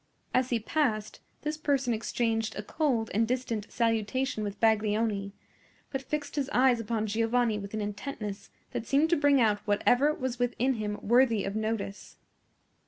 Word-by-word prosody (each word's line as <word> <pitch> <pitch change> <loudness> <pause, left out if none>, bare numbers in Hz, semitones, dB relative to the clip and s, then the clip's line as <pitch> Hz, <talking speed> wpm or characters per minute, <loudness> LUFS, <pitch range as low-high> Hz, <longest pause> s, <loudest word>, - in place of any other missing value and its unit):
As 255 0 +2
he 235 - +1
passed, 220 -4 -1 0.2
this 305 0 -2
person 275 -5 +1
exchanged 225 0 -1
a 210 - -4
cold 245 -3 0
and 225 +2 +2
distant 235 -4 -2
salutation 230 +1 0
with 205 0 -5
Baglioni, 215 -2 +1 0.6
but 270 - -2
fixed 295 +1 -4
his 275 -1 0
eyes 250 -1 +4
upon 225 -1 -1
Giovanni 225 +1 +1
with 200 +1 -6
an 215 - -2
intentness 205 0 -5 0.2
that 225 - -4
seemed 300 +4 +3
to - - +6
bring 285 -2 +4
out 215 -3 +3
whatever 245 +7 +3
was 260 -4 -3
within 245 +2 +1
him 210 -3 -3
worthy 235 -2 +4
of 195 - -3
notice. 220 -2 -3
230 Hz, 160 wpm, -29 LUFS, 215-260 Hz, 0.6 s, to